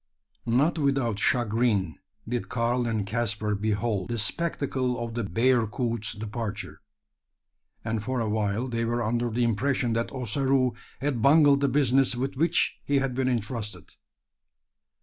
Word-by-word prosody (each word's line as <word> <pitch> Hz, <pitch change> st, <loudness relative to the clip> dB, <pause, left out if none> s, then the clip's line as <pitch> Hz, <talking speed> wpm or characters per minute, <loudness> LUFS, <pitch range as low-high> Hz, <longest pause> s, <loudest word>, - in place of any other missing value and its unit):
Not 140 Hz, +8 st, +2 dB
without 135 Hz, -7 st, +1 dB
chagrin 110 Hz, -7 st, +1 dB, 0.3 s
did 120 Hz, +1 st, -3 dB
Karl 120 Hz, 0 st, 0 dB
and 110 Hz, -3 st, -1 dB
Caspar 110 Hz, -1 st, -1 dB
behold 105 Hz, -1 st, -1 dB
the 120 Hz, -, -2 dB
spectacle 130 Hz, 0 st, 0 dB
of 120 Hz, -1 st, -4 dB
the 120 Hz, 0 st, -2 dB
bearcoot's 115 Hz, 0 st, 0 dB
departure; 105 Hz, -1 st, -5 dB, 1.0 s
and 110 Hz, -1 st, -2 dB
for 130 Hz, +1 st, -2 dB
a 115 Hz, -, -1 dB
while 105 Hz, +2 st, -1 dB
they 115 Hz, -2 st, -2 dB
were 120 Hz, +1 st, 0 dB
under 120 Hz, +2 st, 0 dB
the 120 Hz, +2 st, 0 dB
impression 120 Hz, +1 st, +1 dB
that 115 Hz, +1 st, -1 dB
Ossaroo 130 Hz, +1 st, +1 dB, 0.3 s
had 135 Hz, -4 st, -1 dB
bungled 140 Hz, +1 st, +5 dB
the 140 Hz, -, +2 dB
business 135 Hz, -2 st, +3 dB
with 130 Hz, +3 st, -3 dB
which 165 Hz, +6 st, +1 dB
he 140 Hz, -, +1 dB
had 135 Hz, -2 st, 0 dB
been 130 Hz, 0 st, 0 dB
entrusted. 110 Hz, -6 st, -3 dB
120 Hz, 140 wpm, -27 LUFS, 110-130 Hz, 1.0 s, bungled